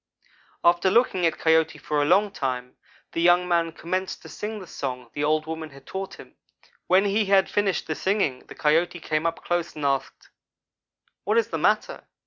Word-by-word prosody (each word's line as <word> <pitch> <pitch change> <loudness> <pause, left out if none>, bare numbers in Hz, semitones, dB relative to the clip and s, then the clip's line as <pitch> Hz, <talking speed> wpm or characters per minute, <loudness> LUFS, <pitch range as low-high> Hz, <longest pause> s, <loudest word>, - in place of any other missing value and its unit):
After 175 +2 +4
looking 185 -5 +3
at 160 - -2
Coyote 160 -1 +2
for 150 0 -1
a - - +2
long 195 +6 +3
time, 125 -7 -4 0.4
the 165 - -2
young 175 +1 +4
man 170 -1 +1
commenced 185 +3 -4
to - - -11
sing 215 +1 -5
the 195 - -8
song 125 -7 -6
the 145 - -2
old 155 +1 +1
woman 160 0 -5
had 140 -1 -16
taught 190 0 -6
him. - - -14 0.5
When 190 +2 +4
he 205 +2 +2
had 195 -1 +4
finished 200 -3 0
the 155 - -2
singing, 190 -9 -1
the - - -11
Coyote 165 +4 +1
came 155 0 -1
up 165 - -4
close 175 -1 -1
and 150 -2 -4
asked: 135 -1 -2 0.9
"'What 210 +4 +1
is 230 -1 +2
the - - -3
matter? - - 0
170 Hz, 190 wpm, -25 LUFS, 155-190 Hz, 0.9 s, After